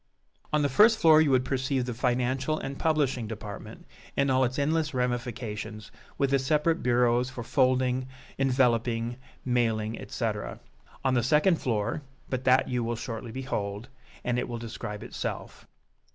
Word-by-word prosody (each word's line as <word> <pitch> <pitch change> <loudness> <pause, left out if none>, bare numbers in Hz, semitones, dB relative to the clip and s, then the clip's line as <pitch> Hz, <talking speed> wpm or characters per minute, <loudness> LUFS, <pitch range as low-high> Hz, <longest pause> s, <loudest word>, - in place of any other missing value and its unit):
On 150 -1 +2
the - - +3
first 215 - +5
floor 160 -4 +6
you 155 - +3
would 130 -1 +3
perceive 130 -1 0
the 125 - -3
financial 130 +4 0
and 135 -1 -5
publishing 140 -7 +1
department 105 -2 -8 0.3
in 140 -1 +3
all 130 0 +3
its 125 +1 -1
endless 150 0 0
ramifications, 120 -4 -3 0.3
with 140 -1 +1
the 140 - +4
separate 150 +5 +1
bureaus 125 0 +2
for 130 -2 -6
folding, 130 0 +2 0.3
enveloping, 120 -3 +1 0.3
mailing, 115 -3 0
etc. - - -3 0.5
On 130 - +3
the 120 - +3
second 150 - +3
floor 115 +4 -1 0.3
but 130 0 -2
that 130 +1 +4
you 125 -1 -1
will 115 +1 -1
shortly 115 0 -6
behold, 110 -3 -4 0.3
and 120 0 0
it - - -3
will 120 - -3
describe 105 -2 -6
itself. - - -6
125 Hz, 150 wpm, -28 LUFS, 120-135 Hz, 0.5 s, floor